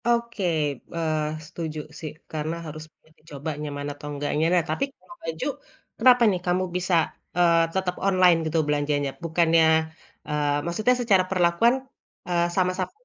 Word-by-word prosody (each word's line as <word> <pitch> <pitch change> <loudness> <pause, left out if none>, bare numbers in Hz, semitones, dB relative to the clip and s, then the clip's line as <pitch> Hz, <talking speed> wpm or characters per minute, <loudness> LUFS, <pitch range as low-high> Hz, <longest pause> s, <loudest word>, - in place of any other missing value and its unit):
Oke, 235 -3 0 0.5
eee, 155 -2 0 0.2
setuju, 160 -1 -5 0.2
sih, 155 -2 -5 0.2
karena 155 +1 -3
harus 155 0 -7 0.4
dicoba 150 -1 -7
nyaman 145 -1 -4
atau 145 +1 -10
enggaknya. 145 +2 -1
Nah, 175 -2 +4
tapi - - 0
kalau 345 - -15
baju, 160 0 -4 0.5
kenapa, 245 0 +6
nih, 180 -2 -2
kamu 180 +1 +1
bisa, 180 0 -1 0.4
eee, 170 -1 +5
tetap 185 -1 -1
online, 185 -3 +5
gitu 160 +1 -1
belanjanya? 145 -1 0
Bukannya, 165 0 +3 0.6
eee, 145 -1 0
maksudnya 215 +9 +2
secara 200 -6 +4
perlakuan, 180 +6 +3 0.5
eee, 175 -1 +2
sama-sama 185 0 0
170 Hz, 140 wpm, -25 LUFS, 155-185 Hz, 0.6 s, kenapa